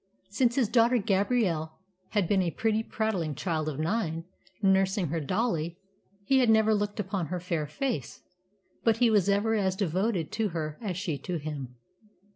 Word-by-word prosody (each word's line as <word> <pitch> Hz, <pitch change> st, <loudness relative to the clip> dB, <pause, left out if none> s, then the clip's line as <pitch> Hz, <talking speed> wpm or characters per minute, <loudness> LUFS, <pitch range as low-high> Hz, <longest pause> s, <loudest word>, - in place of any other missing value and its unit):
Since 235 Hz, +3 st, +2 dB
his 255 Hz, -5 st, +3 dB
daughter 235 Hz, +2 st, +4 dB
Gabrielle 195 Hz, -6 st, +1 dB, 0.4 s
had 205 Hz, -5 st, +1 dB
been 195 Hz, 0 st, +3 dB
a 175 Hz, -, +1 dB
pretty, 220 Hz, +5 st, 0 dB
prattling 205 Hz, -9 st, -2 dB
child 155 Hz, -1 st, -1 dB
of 145 Hz, -, -5 dB
nine, 165 Hz, 0 st, -1 dB, 0.4 s
nursing 190 Hz, -2 st, +2 dB
her 165 Hz, +2 st, -1 dB
dolly, 170 Hz, -, -1 dB, 0.5 s
he 270 Hz, +3 st, +4 dB
had 245 Hz, -3 st, +3 dB
never 220 Hz, 0 st, +5 dB
looked 205 Hz, 0 st, -1 dB
upon 190 Hz, -4 st, -2 dB
her 180 Hz, +2 st, -3 dB
fair 170 Hz, -4 st, -2 dB
face. 150 Hz, -, -3 dB, 0.6 s
But 225 Hz, -1 st, +3 dB
he 235 Hz, -1 st, +4 dB
was 205 Hz, -3 st, +3 dB
ever 205 Hz, +3 st, +2 dB
as 190 Hz, -4 st, +1 dB
devoted 190 Hz, -1 st, -1 dB
to 220 Hz, -2 st, 0 dB
her 155 Hz, -1 st, -4 dB
as 190 Hz, -6 st, -3 dB
she 170 Hz, -7 st, -2 dB
to 175 Hz, +5 st, -3 dB
him. 145 Hz, -5 st, -6 dB
195 Hz, 170 wpm, -28 LUFS, 165-220 Hz, 0.6 s, never